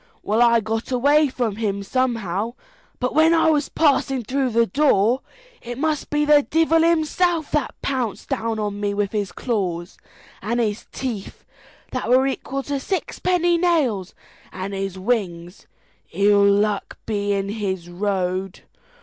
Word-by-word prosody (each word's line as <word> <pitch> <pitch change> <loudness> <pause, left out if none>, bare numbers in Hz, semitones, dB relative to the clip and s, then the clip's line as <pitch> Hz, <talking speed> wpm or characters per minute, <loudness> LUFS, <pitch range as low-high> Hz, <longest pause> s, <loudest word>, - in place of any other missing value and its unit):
Well, 215 +3 +1
I 235 -1 +5
got 225 +3 -3
away 290 +4 +4
from 235 -5 -2
him 200 -3 -2
somehow, 230 -2 -1 0.4
but 250 0 -1
when 320 +2 +5
I 320 -1 +4
was 295 -2 0
passing 270 -4 +2
through 265 +3 0
the 230 0 +3
door, 255 -3 +2 0.4
it 240 0 -7
must 305 +1 -1
be 295 0 +1
the 295 -1 +6
divel 325 +2 +2
himself 335 0 +1
that 300 -3 -1
pounced 255 -6 -2
down 225 0 -1
on 205 -1 -3
me 205 0 -1
with 200 -1 -1
his 205 -3 -2
claws, 180 -8 -3 0.4
and 235 +4 -1
his 215 -3 -2
teeth, 230 -7 -6 0.5
that 255 -3 -3
were 255 +2 +5
equal 270 0 -3
to 285 0 -2
sixpenny 350 +1 0
nails, 275 - +1 0.4
and 190 +1 -5
his 195 -1 -4
wings 185 -4 -3 0.4
ill 200 0 +4
luck 205 0 0
be 205 -2 -1
in 195 0 -1
his 190 -5 -3
road! 185 0 -2
230 Hz, 150 wpm, -22 LUFS, 200-280 Hz, 0.5 s, the